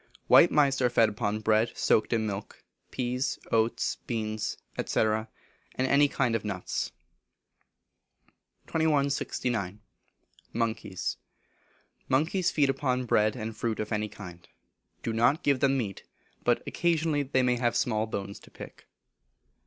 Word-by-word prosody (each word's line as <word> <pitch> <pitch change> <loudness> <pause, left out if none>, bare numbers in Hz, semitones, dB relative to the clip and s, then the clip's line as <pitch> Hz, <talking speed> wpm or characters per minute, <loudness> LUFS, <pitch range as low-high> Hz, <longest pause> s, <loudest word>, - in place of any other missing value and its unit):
White - - +7
Mice 140 -3 +3
are 125 - +4
fed 115 -2 +4
upon 105 0 -2
bread 110 +1 +2
soaked 110 - +2
in 115 -2 +1
milk, 100 -1 -6 0.3
peas, 125 +1 -2
oats, 115 0 +1
beans, 110 -2 -2 0.3
&c., - - -1
and 110 0 +1 0.5
any 140 +3 +4
kind 125 -4 0
of 115 - -1
nuts. 100 -4 -3 1.7
2169. 140 - 0 0.7
Monkeys. 110 -4 -2 0.9
Monkeys 170 +7 +2
feed 140 -5 +2
upon 130 -2 -1
bread, 110 -1 +2
and 110 -2 -5
fruit 110 0 -2
of 110 0 -3
any 105 0 -1
kind. 90 -4 -11 0.6
Do 115 - -2
not 120 +7 +2
give 140 -2 +2
them 135 0 +3
meat, 105 -7 -3 0.4
but - - +2
occasionally 160 -3 +1
they 130 -2 +1
may 125 -1 +2
I - - -8
have 120 -1 +1
small 110 -3 +1
bones 100 -2 -5
to - - -17
pick. - - -12
115 Hz, 135 wpm, -28 LUFS, 110-135 Hz, 1.7 s, White